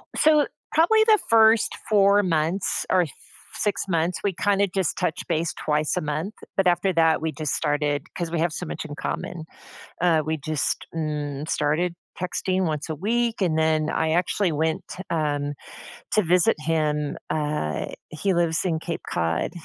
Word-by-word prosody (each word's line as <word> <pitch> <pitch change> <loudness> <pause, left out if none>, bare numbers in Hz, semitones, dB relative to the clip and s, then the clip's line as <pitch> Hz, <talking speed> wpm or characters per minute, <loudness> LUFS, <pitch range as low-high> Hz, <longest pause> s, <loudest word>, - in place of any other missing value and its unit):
So, 300 -1 +4 0.2
probably 435 +8 +5
the 435 -2 +5
first 225 -1 +5
4 200 -1 +5
months 165 +2 0
or 185 -1 +5
s 155 - -6 0.4
six 205 - 0
months, 170 0 0
we 200 - +1
kinda 200 +2 +2
just 190 -3 -1
touched 155 - -2
base 160 +1 0
twice 150 0 0
a - - 0
month, 155 +7 -3 0.2
but 195 - +3
after 175 +2 +2
that, 160 -2 +3
we 160 -1 -1
just 155 0 -3
started, 145 -1 0
'cause 170 -2 -3
we 170 - -1
have 170 0 +1
so 180 - -4
much - - -5
in 145 -2 -7
common. 160 0 -4 0.6
Uh, 165 -3 +4
we 155 0 -1
just, 155 0 -1
mm, 150 -2 -3
started 155 +4 +1 0.3
texting 185 +1 -1
once 155 -2 -2
a 155 - -2
week, 230 +5 0
and 165 -4 +2
then 155 -1 +2
I 160 -1 0
actually 175 +1 +1
went, 160 +1 -1 0.2
um, 145 -3 -1 0.6
to 215 - +4
visit 180 +4 +3
him, 150 -2 0
uh, 150 - -1 0.2
he 185 +5 -1
lives 170 -2 +1
in 170 -4 0
Cape 165 +1 -5
Cod, 85 0 -1
165 Hz, 170 wpm, -24 LUFS, 155-190 Hz, 0.6 s, probably